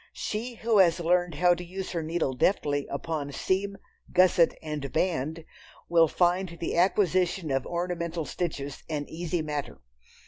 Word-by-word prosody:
She 235 +3 -4
who 225 -2 +2
has 175 -2 +5
learned 175 0 +1
how 180 0 +4
to 175 - -5
use 185 +2 -6
her 170 - -2
needle 160 -4 -1
deftly 145 -1 +1
upon 145 0 -3
"seam, 195 +6 -1 0.3
gusset 180 -2 +4
and 150 -3 -4
band," 160 0 -1 0.4
will 165 -1 +5
find 175 +1 +1
the 170 - -2
acquisition 180 -2 +2
of 135 -1 0
ornamental 170 -2 -2
stitches 145 -6 -4
an 150 -2 -2
easy 170 0 -3
matter. 150 -2 -4
170 Hz, 145 wpm, -28 LUFS, 155-180 Hz, 0.4 s, has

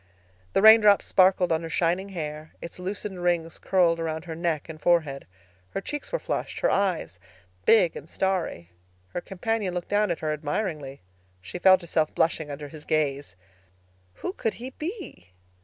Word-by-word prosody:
The 195 - +2
raindrops 215 -2 +8
sparkled 185 -1 +4
on 160 0 +2
her 165 - -6
shining 175 +4 0
hair; 155 -4 -6
its 170 - -8
loosened 190 0 -5
rings 170 -2 0
curled 175 -3 +2
around 160 0 -3
her 165 - -5
neck 165 -3 -2
and 155 -1 -9
forehead. 155 -6 +1 0.4
Her - - -3
cheeks 295 +8 -5
were - - +1
flushed, - - -4
her - - +3
eyes 165 - 0 0.5
big 200 -7 +5
and 150 - -9
starry. 175 - -2 0.4
Her 175 - -4
companion 195 0 -2
looked 175 - -4
down 210 +1 +2
at 170 - -2
her 155 -1 0
admiringly. 150 - -3 0.4
She 95 - -8
felt 185 0 +6
herself 160 -2 -1
blushing 160 -2 +1
under 145 +1 -6
his 150 +1 -11
gaze. 145 -6 -1 0.8
Who 365 - -5
could 225 - -2
he 250 +3 -7
be? 315 - -7
170 Hz, 165 wpm, -26 LUFS, 155-195 Hz, 0.8 s, raindrops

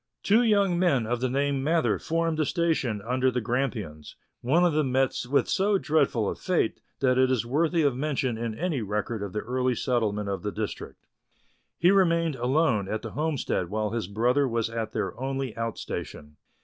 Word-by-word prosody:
Two 215 +4 +4
young 200 -6 +3
men 140 -10 +2
of 120 +2 -1
the 130 - +1
name 140 +2 0
of - - -2
Mather 160 +3 +1
formed 165 -1 -1
a 155 - +2
station 155 - 0
under 130 +2 +1
the 125 0 -1
Grampians; 115 - -3 0.3
one 160 +9 +3
of 170 - +2
them 150 -4 +1
met 130 0 +2
with 140 - +2
so 200 +1 +2
dreadful 145 - +1
a - - -1
fate 180 - -1 0.2
that 130 -1 +3
it 130 0 +4
is 125 -3 +1
worthy 160 +6 +1
of 140 -4 +2
mention 135 -3 -1
in 115 -1 -4
any 165 -7 -1
record 105 +1 -3
of 100 -2 -4
the 105 - -3
early 125 +1 0
settlement 110 -5 -1
of 100 -3 -3
the 105 - -3
district. 105 0 -6 0.7
He 175 +2 +4
remained 170 -5 +3
alone 125 -4 +1
at 110 +1 -3
the 115 - -6
homestead 145 - -1
while 105 0 -1
his 115 -5 -2
brother 125 +7 +2
was 115 -2 -1
at 115 -1 -3
their - - -3
only 135 -3 -3
out 115 0 -3
station. 75 0 -7
130 Hz, 195 wpm, -27 LUFS, 110-155 Hz, 0.7 s, Two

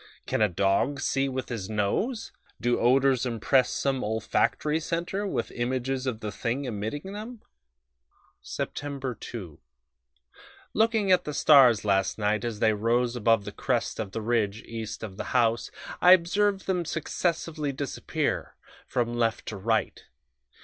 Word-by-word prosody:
"Can - - -1
a 105 - +4
dog 100 +10 +1
see 135 0 0
with 130 0 -4
his 110 -5 -4
nose? 110 - -1 0.3
Do 120 +2 +1
odors 130 +1 +3
impress 125 +2 +2
some 135 -2 -1
olfactory 110 +8 0
centre 175 +5 -2
with - - -2
images 130 +2 -2
of 115 -3 -3
the 105 - -4
thing 120 +7 -2
emitting 125 - -4
them?... 220 +2 -8 1.0
"Sept 135 -5 -4
2. 90 -11 -8 1.1
Looking 220 -3 +2
at 180 - +4
the 150 - -4
stars 125 -8 +6
last 95 -1 +1
night 105 0 0
as 115 -3 -3
they 110 +1 +3
rose 120 +3 +1
above 115 -3 +2
the 105 - -5
crest 120 +2 -1
of 105 -4 -3
the 115 - -4
ridge 110 -2 0
east 115 -1 -6
of 100 -3 -7
the - - -4
house, 115 -1 +2 0.3
I 180 - +9
observed 190 +3 +2
them 180 -2 0
successively 160 -1 -2
disappear 140 0 -3 0.3
from 120 -1 -1
left 115 -2 0
to 110 - -6
right. 110 +3 -1
125 Hz, 145 wpm, -27 LUFS, 110-150 Hz, 1.1 s, I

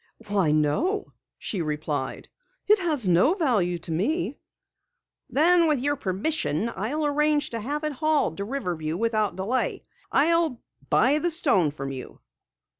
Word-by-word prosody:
"Why, 195 -6 +2
no," 155 - 0 0.2
she 195 - -4
replied. 150 -3 -3 0.4
"It 425 0 +5
has 305 - 0
no 185 - +4
value 215 - +1
to 165 0 -7
me." 280 - -1 0.9
"Then 335 +3 +4
with 305 -2 +2
your 290 +3 0
permission, 215 - -1
I'll 290 +10 -2
arrange 295 0 +1
to 230 - -3
have 290 +7 -3
it 305 - -1
hauled 295 - +1
to 200 - -3
Riverview 180 - -3
without 215 -3 0
delay. 205 +8 -1 0.3
I'll 320 -3 +3 0.3
buy 280 +5 +4
the 345 - 0
stone 275 - +2
from 135 -1 -6
you." 130 -2 -8
240 Hz, 140 wpm, -25 LUFS, -, 0.9 s, It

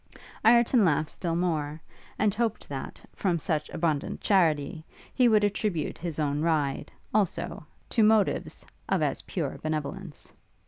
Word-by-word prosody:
Ireton 235 +1 +5
laughed 155 -3 +2
still 170 -2 -2
more; 155 -4 -1 0.4
and 205 -1 +2
hoped 225 0 -1
that, 135 -2 -6
from 180 -4 0
such 155 -1 -2
abundant 160 -4 -1
charity, 160 -4 +2 0.3
he 250 -2 +4
would 215 -2 +4
attribute 205 -5 -1
his 165 -3 -4
own 145 -1 0
ride, 155 -4 0 0.2
also, 195 -6 -1 0.2
to 230 - +2
motives 215 -2 +2 0.2
of - - +2
as - - 0
pure - - -4
benevolence. 155 -2 -5
170 Hz, 135 wpm, -28 LUFS, 150-210 Hz, 0.4 s, Ireton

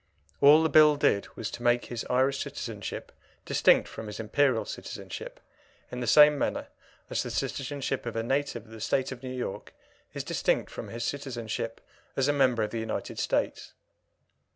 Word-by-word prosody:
All 150 +3 +8
the 160 - +2
Bill 150 -1 +7
did 100 -8 +2
was 110 - -4
to - - -7
make 120 0 +2
his 120 -2 -5
Irish 130 +2 +2
citizenship 115 -7 -6 0.3
distinct - - +4
from 110 - -8
his 105 - -7
Imperial 120 +2 +2
citizenship, - - -7 0.5
in 125 - -5
the 120 - -3
same 150 +1 +7
manner - - -2 0.4
as - - 0
the - - -4
citizenship 135 -1 -3
of 115 - -4
a 115 - -1
native 135 -2 -1
of 110 - -18
the 110 -1 -10
State 135 +4 0
of 125 -2 -7
New 130 - -6
York 125 -6 -5 0.4
is - - -3
distinct - - 0
from - - -7
his 115 0 -5
citizenship 120 -4 -4 0.3
as 135 0 +2
a 145 - +3
member 130 -5 +3
of 105 - -3
the 115 - -3
United 110 -1 -4
States. - - -1
125 Hz, 175 wpm, -28 LUFS, 115-140 Hz, 0.5 s, All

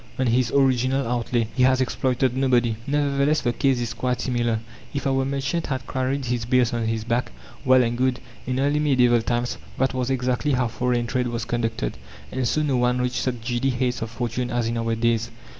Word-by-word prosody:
on 130 - +1
his 120 0 +2
original 130 -1 +2
outlay. 120 -1 0
He 130 - +1
has 130 0 +4
exploited 130 0 0
nobody." 125 -4 +2
Nevertheless 145 +1 +1
the 120 - 0
case 135 0 +1
is 120 -2 -2
quite 125 -1 -1
similar. 120 -3 0 0.4
If 140 - -2
our 135 -1 +2
merchant 140 +5 -2
had 130 -2 -3
carried 130 +1 -2
his 120 -1 -1
bales 125 -1 +2
on 115 -1 -1
his 110 -1 -1
back, 120 +2 -1 0.3
well 130 -1 +5
and 120 0 -1
good! 130 0 +1 0.3
In 130 0 -1
early 145 +2 +2
medieval 125 -5 +4
times 120 +1 -2 0.2
that 130 0 +1
was 130 0 -1
exactly 130 +2 0
how 125 -2 +1
foreign 125 0 0
trade 125 +1 -1
was 120 -1 -3
conducted, 115 - -2 0.3
and 130 -2 -1
so 155 +6 +1
no 140 -4 +1
one 125 0 +2
reached 125 -1 -1
such 125 -3 -2
giddy 120 +3 0
heights 125 0 -1
of 115 - -3
fortune 120 +1 -3
as 120 -1 0
in 115 - -2
our 115 0 0
days. 115 0 +1
125 Hz, 205 wpm, -24 LUFS, 120-130 Hz, 0.4 s, well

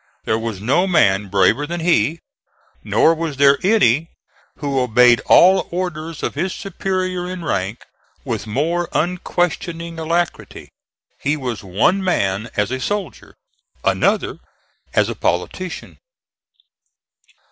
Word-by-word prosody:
There 110 - 0
was 110 -4 -4
no 135 - +1
man 105 - +3
braver 100 +9 +2
than 170 +1 -4
he, 165 -2 +1 0.6
nor 165 - +3
was 160 -3 -4
there 140 0 +5
any 165 - +3 0.5
who 140 -2 -1
obeyed 125 0 +4
all 190 +2 +6
orders 165 -3 -4
of - - -1
his 190 0 -2
superior 185 -1 -3
in 180 -2 -6
rank 100 -2 -2 0.4
with 105 - -4
more 165 +10 -1
unquestioning 170 -1 -2
alacrity. 170 +2 -3 0.5
He 150 +2 0
was 125 -7 -5
one 115 - +1
man 105 - 0
as 105 +3 0
a 130 - -2
soldier, 205 +8 -4 0.5
another - - +1 0.6
as - - +3
a - - -3
politician. - - -3
155 Hz, 120 wpm, -19 LUFS, 115-175 Hz, 0.6 s, all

